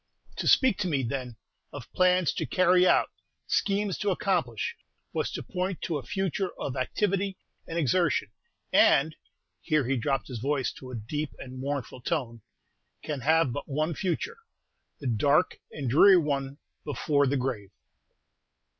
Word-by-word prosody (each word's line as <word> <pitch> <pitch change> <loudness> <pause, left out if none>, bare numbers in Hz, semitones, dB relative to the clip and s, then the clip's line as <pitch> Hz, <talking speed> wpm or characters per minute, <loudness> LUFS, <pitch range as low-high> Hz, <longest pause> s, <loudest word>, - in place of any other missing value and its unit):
To - - -2
speak 260 -7 +4
to 185 - 0
me, 140 -6 0
then, 125 0 -4 0.4
of 140 -5 -10
plans 185 -2 +3
to - - -3
carry 185 0 +4
out, - - +3 0.3
schemes 200 -1 0
to 205 - 0
accomplish, 170 - -1 0.4
was - - -1
to - - -4
point 180 0 -3
to 160 -4 -1
a - - -10
future 195 -1 -2
of 130 - -3
activity 195 +8 -1 0.3
and 165 - -4
exertion; 160 - +1 0.4
and!" 155 +3 +5 0.5
here 155 -5 +1
he 135 +2 0
dropped 135 +3 -1
his 125 -4 -6
voice 135 +2 0
to 130 - -10
a 130 - -6
deep 145 +7 -4
and 130 0 -9
mournful 135 -2 -4
tone 120 -6 -2 0.6
"can 150 -3 -3
have 155 0 +3
but 145 - -6
one 155 +4 0
future, 190 - -2 0.6
the 140 - -10
dark 140 +8 +2
and 140 -4 -5
dreary 180 +10 +7
one 140 -3 -1 0.3
before 145 -1 +1
the 140 +2 +1
grave!" 125 -7 -3
145 Hz, 155 wpm, -28 LUFS, 130-180 Hz, 0.6 s, dreary